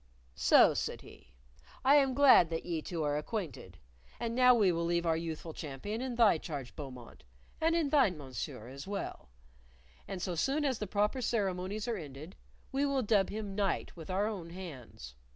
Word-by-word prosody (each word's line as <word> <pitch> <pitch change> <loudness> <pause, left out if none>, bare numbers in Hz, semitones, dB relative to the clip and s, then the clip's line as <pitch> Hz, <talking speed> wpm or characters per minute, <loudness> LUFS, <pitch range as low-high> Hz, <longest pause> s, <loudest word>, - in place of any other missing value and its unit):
"So," - - +6
said - - -3
he, - - -17 0.5
"I 275 - +7
am 270 -3 +3
glad 270 - +7
that 165 -1 -4
ye 165 -3 -2
two 165 0 -4
are 145 0 0
acquainted. 150 - -5 0.4
And 230 -1 -2
now 250 0 +6
we 205 -5 +4
will 170 0 -1
leave 170 0 0
our 165 -1 +2
youthful 160 0 -5
champion 155 - -5
in 255 -2 -3
thy 225 -8 +5
charge, 140 -7 -6
Beaumont 130 -5 -9 0.4
and 325 +1 +3
in 325 -4 +1
thine, 260 - +3
Mon 135 -3 -10
Sieur, 110 -1 -5
as 140 +5 -9
well 200 - -5 0.8
and 190 - -5
so 180 0 -2
soon 275 - 0
as 260 -5 0
the 210 - -3
proper 210 +6 0
ceremonies 205 -1 -1
are 235 -2 -1
ended, 150 +1 -9 0.4
we 275 +1 0
will 275 -2 +1
dub 205 -3 +2
him 205 -1 -5
knight 200 -1 -1
with 165 -1 -10
our 190 +2 +1
own 195 -6 -4
hands. 165 - -9
190 Hz, 190 wpm, -32 LUFS, 160-230 Hz, 0.8 s, I